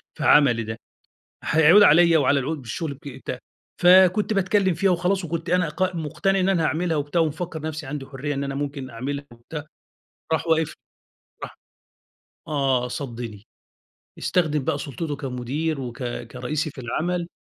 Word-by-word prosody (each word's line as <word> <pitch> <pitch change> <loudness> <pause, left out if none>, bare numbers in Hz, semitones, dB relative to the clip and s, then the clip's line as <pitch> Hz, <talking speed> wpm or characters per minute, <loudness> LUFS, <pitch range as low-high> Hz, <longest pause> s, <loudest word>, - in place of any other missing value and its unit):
في - - -5
عملي 120 -6 +5
ده. 110 +1 -5 0.7
هيعود 160 +6 +6
عليّا 170 -1 +6
وعلى 140 0 +3
العود 150 +4 -3
بالشغل 140 +4 -5
بي 135 -1 -11
ت 125 - -3 0.4
فكنت 185 +4 +6
باتكلّم 190 -1 +2
فيها 195 +4 +2
وخلاص 180 +1 +1
وكنت 170 +1 -4
أنا 180 -2 +2
ق 185 +3 -1
مٌقتَنِع 190 +5 0
إن 185 - +2
أنا 180 -4 +2
هاعملها 165 0 0
وبتاع 145 +4 0
ومفكَّر 160 0 -2
نفسي 155 -2 -5
عندي 135 -1 -5
حُرية 145 +2 -4
إن 140 +1 -2
أنا 140 0 -4
ممكن 140 -2 -4
أعملها 140 +5 -4
وبتاع، 145 +6 -8 0.7
راح 160 - -1
واقف 160 -1 +3
لي. - - -12 0.7
راح - - -7 0.9
آه 135 -4 +1
صدِّني. 120 -6 -6 0.7
استخدم 155 -6 0
بقى 145 - 0
سُلطته 145 +2 -4
كمُدير 140 +3 -3
وك 125 0 -6
كرئيسي 125 +5 -3
في 135 - -10
العمل 170 +8 -2
150 Hz, 155 wpm, -24 LUFS, 135-170 Hz, 0.9 s, هيعود